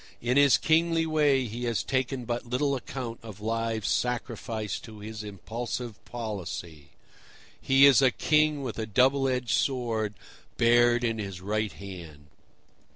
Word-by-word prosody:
In 120 +2 0
his 140 -2 +6
kingly 165 +1 +2
way 145 -4 +2
he 120 +2 -5
has 115 -2 0
taken 130 -1 -1
but 120 +1 -2
little 140 +3 0
account 125 -2 -6
of 110 -3 -10
lives 115 -2 -2
sacrificed 115 - -2
to 110 -2 -11
his 105 +1 -7
impulsive 115 +3 -6
policy; 90 - -6 0.7
he 135 +1 +6
is 140 -2 +7
a 135 - +6
king 150 +2 +2
with 120 -3 -5
a 110 - -3
double 135 +5 +3
edged 125 -2 -1
sword 115 -5 -1 0.4
bared 120 +1 +4
in 115 -2 0
his 95 -3 -5
right 105 +2 -2
hand. 85 -7 -10
120 Hz, 145 wpm, -27 LUFS, 105-130 Hz, 0.7 s, is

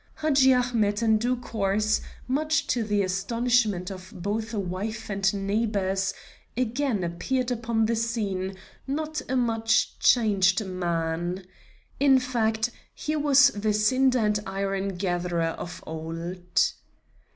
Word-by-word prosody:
Hadji 275 -4 +4
Ahmet 235 -4 +1
in 220 -1 +4
due 245 +3 +1
course, 215 -3 0 0.3
much 305 +4 +1
to 240 - 0
the 205 -2 +1
astonishment 210 0 0
of 185 -1 -9
both 210 +4 -3
wife 210 +2 -4
and 195 0 +2
neighbors, 195 -2 0 0.5
again 245 -3 0
appeared 250 +9 -1
upon 230 -2 0
the 230 +1 +1
scene 205 -5 -2 0.3
not 310 +3 -2
a 260 - 0
much 225 -3 +1
changed 200 -4 +3
man. 175 0 -2 0.5
In 275 -1 +6
fact, 235 -3 0 0.2
he 305 - -2
was 285 -2 +6
the 210 -3 -1
cinder 255 +5 +3
and 210 -2 +1
iron 195 0 -2
gatherer 175 -2 -1
of 175 - -7
old. 165 +3 -2
215 Hz, 120 wpm, -26 LUFS, 190-245 Hz, 0.5 s, In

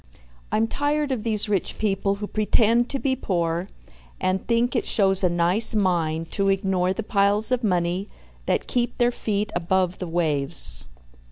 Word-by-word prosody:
I'm 220 - +2
tired 290 +3 -1
of 255 -4 -1
these 215 -2 0
rich 200 -3 -1
people 200 -1 0
who 205 +1 -5
pretend 225 +3 +2
to 275 - -2
be 270 -1 0
poor, 175 -6 -2 0.5
and 185 0 -1
think 240 +2 +1
it 235 - -1
shows 195 -2 +2
a 180 - +4
nice 175 +7 +1
mind 165 -5 0
to 195 -1 0
ignore 190 -2 +1
the 220 +4 -3
piles 205 +2 +1
of 250 -1 0
money 180 0 0 0.4
that - - 0
keep 245 -1 -1
their 240 0 +3
feet 210 -3 -2
above 180 +1 0
the 180 - -4
waves. 155 -5 +2
200 Hz, 165 wpm, -23 LUFS, 180-225 Hz, 0.5 s, a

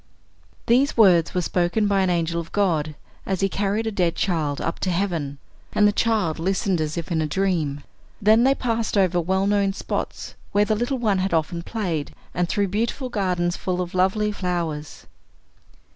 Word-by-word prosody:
These 255 +4 +3
words 180 -7 +5
were 180 - +1
spoken 180 +5 +1
by 200 -1 +2
an 190 - +2
angel 170 -1 0
of 165 - -12
God, 160 -7 0 0.3
as 190 -1 -2
he 195 - +3
carried 205 +3 -1
a 220 - -1
dead 180 -5 0
child 155 -6 -1
up 165 - -3
to 190 - -1
heaven, 170 -6 -1 0.4
and 210 - +5
the - - +4
child 210 -8 0
listened 185 0 0
as 155 +1 -3
if 170 +1 -5
in 160 -2 +1
a 155 - 0
dream. 155 -6 -1 0.4
Then 220 +3 +5
they 270 +1 +4
passed 230 -4 -1
over 180 -3 +3
well 190 +3 0
known 200 -1 +2
spots, - - -4 0.2
where 205 +1 +4
the 215 - +1
little 240 +5 -1
one 210 -6 +1
had 185 -2 0
often 165 +2 -1
played, 170 -8 -3 0.2
and 175 0 -1
through 200 -2 0
beautiful 235 +6 -2
gardens 180 -5 0
full 180 -1 -2
of 180 -1 -3
lovely 190 +3 +2
flowers. 170 -6 -4
185 Hz, 185 wpm, -23 LUFS, 170-205 Hz, 0.4 s, words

